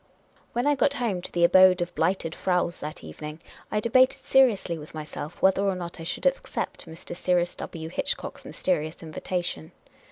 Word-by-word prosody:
When 240 Hz, +2 st, 0 dB
I 290 Hz, -, +4 dB
got 280 Hz, 0 st, +2 dB
home 225 Hz, -9 st, -1 dB
to -, -, -5 dB
the 175 Hz, -, +1 dB
Abode 185 Hz, +1 st, +7 dB
of 175 Hz, 0 st, -2 dB
Blighted 180 Hz, -3 st, 0 dB
Fraus 180 Hz, -1 st, 0 dB
that 150 Hz, +1 st, -7 dB
evening, 150 Hz, -, -8 dB, 0.3 s
I 210 Hz, -, 0 dB
debated 255 Hz, +4 st, +3 dB
seriously 235 Hz, -10 st, +4 dB
with 150 Hz, +1 st, -11 dB
myself 155 Hz, +1 st, -7 dB
whether 190 Hz, 0 st, +5 dB
or 195 Hz, -1 st, +1 dB
not 175 Hz, -1 st, -6 dB
I -, -, -6 dB
should 165 Hz, -, -4 dB
accept -, -, -1 dB
Mr. 170 Hz, +2 st, -9 dB
Cyrus 175 Hz, -1 st, +1 dB
\V. 160 Hz, -1 st, -7 dB
Hitchcock's 165 Hz, -, -3 dB
mysterious 155 Hz, -2 st, -2 dB
invita 175 Hz, +3 st, -3 dB
tion. 80 Hz, -, -5 dB
180 Hz, 180 wpm, -26 LUFS, 165-205 Hz, 0.3 s, Abode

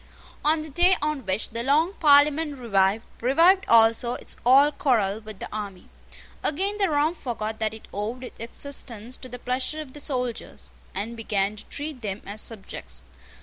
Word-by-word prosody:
On 310 Hz, +1 st, +3 dB
the 310 Hz, -, -7 dB
day 355 Hz, +5 st, +4 dB
on 295 Hz, -6 st, -2 dB
which 190 Hz, +3 st, -1 dB
the 230 Hz, +1 st, -3 dB
long 305 Hz, +8 st, +2 dB
Parliament 295 Hz, -1 st, +4 dB
revived, 205 Hz, -3 st, +1 dB, 0.2 s
revived 335 Hz, -, +5 dB
also 230 Hz, +1 st, +4 dB
its -, -, -10 dB
old 280 Hz, +4 st, +5 dB
quarrel 220 Hz, -7 st, +2 dB
with 215 Hz, -2 st, -10 dB
the -, -, -6 dB
army. 200 Hz, -4 st, -6 dB, 0.5 s
Again 390 Hz, +7 st, 0 dB
the 390 Hz, -3 st, +3 dB
Rump 305 Hz, +3 st, +2 dB
forgot 220 Hz, -3 st, -4 dB
that 220 Hz, 0 st, -1 dB
it 220 Hz, -, -13 dB
owed 220 Hz, +6 st, -3 dB
its 250 Hz, -, -10 dB
existence 235 Hz, -1 st, -5 dB
to 255 Hz, -, -11 dB
the 245 Hz, -, -7 dB
pleasure 255 Hz, +5 st, -2 dB
of 290 Hz, -4 st, -8 dB
the 295 Hz, -, -9 dB
soldiers, 250 Hz, -5 st, -4 dB, 0.2 s
and 215 Hz, +5 st, -3 dB
began 210 Hz, -2 st, -1 dB
to 210 Hz, -, -10 dB
treat 290 Hz, -3 st, -6 dB
them 200 Hz, -2 st, -4 dB
as 205 Hz, +2 st, -3 dB
subjects. 215 Hz, -4 st, -6 dB
250 Hz, 175 wpm, -25 LUFS, 220-295 Hz, 0.5 s, revived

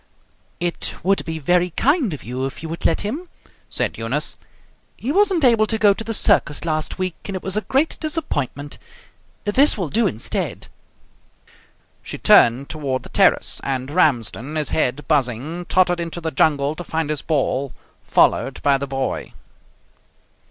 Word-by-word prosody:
"It 175 Hz, 0 st, -2 dB
would 195 Hz, +2 st, +2 dB
be 160 Hz, -1 st, -4 dB
very 175 Hz, +4 st, +2 dB
kind 270 Hz, -, +1 dB
of 145 Hz, -6 st, -7 dB
you 130 Hz, +3 st, -3 dB
if 135 Hz, -, -9 dB
you 160 Hz, -, -5 dB
would 165 Hz, -, 0 dB
let -, -, 0 dB
him," 285 Hz, -, -4 dB, 0.4 s
said -, -, -2 dB
Eunice. -, -, -2 dB, 0.6 s
"He 255 Hz, -, -3 dB
wasn't 380 Hz, -2 st, +2 dB
able 225 Hz, -3 st, +4 dB
to 220 Hz, -, 0 dB
go 210 Hz, -2 st, +5 dB
to 225 Hz, -, -6 dB
the 225 Hz, -, -4 dB
circus 150 Hz, -4 st, +2 dB
last 155 Hz, -1 st, -2 dB
week, 185 Hz, -2 st, -1 dB
and 195 Hz, -, -4 dB
it 185 Hz, -, -5 dB
was 190 Hz, 0 st, -1 dB
a 215 Hz, -, +1 dB
great 270 Hz, +10 st, 0 dB
disappointment; 145 Hz, -, -3 dB, 0.6 s
this 260 Hz, +8 st, +3 dB
will 180 Hz, -6 st, -2 dB
do 225 Hz, +4 st, +2 dB
instead." 110 Hz, -, -3 dB, 1.3 s
She -, -, -7 dB
turned 120 Hz, +4 st, +5 dB
toward 140 Hz, -4 st, -3 dB
the -, -, -11 dB
terrace, -, -, +2 dB
and 130 Hz, 0 st, -3 dB
Ramsden, 140 Hz, -, +1 dB
his 155 Hz, -1 st, 0 dB
head 145 Hz, -1 st, -1 dB
buzzing, 145 Hz, +4 st, -1 dB
tottered 180 Hz, -1 st, +2 dB
into 170 Hz, 0 st, -4 dB
the 160 Hz, -1 st, -3 dB
jungle 145 Hz, 0 st, +2 dB
to 175 Hz, -, -5 dB
find 160 Hz, -2 st, -2 dB
his 150 Hz, -, -2 dB
ball, 140 Hz, -3 st, -1 dB, 0.3 s
followed -, -, +2 dB
by 140 Hz, -1 st, +3 dB
the 140 Hz, -, -4 dB
boy. 135 Hz, 0 st, -3 dB
160 Hz, 165 wpm, -21 LUFS, 140-205 Hz, 1.3 s, go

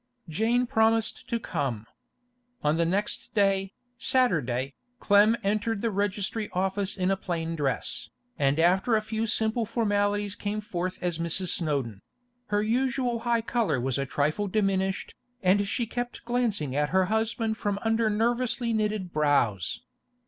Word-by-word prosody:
Jane 225 Hz, +9 st, +1 dB
promised 225 Hz, -3 st, +1 dB
to 235 Hz, -, 0 dB
come. 125 Hz, -, -3 dB, 0.8 s
On 150 Hz, +2 st, +2 dB
the 170 Hz, 0 st, +2 dB
next 200 Hz, +6 st, -2 dB
day, 195 Hz, -2 st, +2 dB, 0.3 s
Saturday, 140 Hz, -, +1 dB, 0.3 s
Clem 205 Hz, +3 st, +5 dB
entered 210 Hz, +2 st, 0 dB
the 230 Hz, -, +1 dB
registry 205 Hz, +2 st, -1 dB
office 195 Hz, +2 st, -1 dB
in 185 Hz, 0 st, +1 dB
a -, -, +3 dB
plain 165 Hz, -3 st, -3 dB
dress, 140 Hz, -4 st, -2 dB, 0.3 s
and 140 Hz, 0 st, +1 dB
after 190 Hz, +7 st, +3 dB
a 215 Hz, -, +2 dB
few 220 Hz, +1 st, -2 dB
simple 220 Hz, +2 st, +1 dB
formalities 205 Hz, -2 st, 0 dB
came 210 Hz, +1 st, -3 dB
forth 185 Hz, -4 st, -3 dB
as 175 Hz, -2 st, -1 dB
Mrs. 170 Hz, +2 st, 0 dB
Snowdon; 140 Hz, -, -1 dB, 0.5 s
her 205 Hz, 0 st, +1 dB
usual 245 Hz, +1 st, 0 dB
high 235 Hz, -1 st, +3 dB
colour 230 Hz, -, 0 dB
was 130 Hz, +1 st, -1 dB
a 135 Hz, -, -2 dB
trifle 155 Hz, +10 st, 0 dB
diminished, 195 Hz, -1 st, 0 dB, 0.3 s
and 200 Hz, +2 st, +3 dB
she 235 Hz, +4 st, -1 dB
kept 245 Hz, +2 st, -5 dB
glancing 225 Hz, -, 0 dB
at 150 Hz, 0 st, +1 dB
her 190 Hz, 0 st, +3 dB
husband 220 Hz, +2 st, 0 dB
from 205 Hz, -3 st, -1 dB
under 225 Hz, 0 st, +2 dB
nervously 235 Hz, +2 st, 0 dB
knitted 210 Hz, -4 st, -1 dB
brows. 140 Hz, -, +1 dB
205 Hz, 145 wpm, -27 LUFS, 170-225 Hz, 0.8 s, Clem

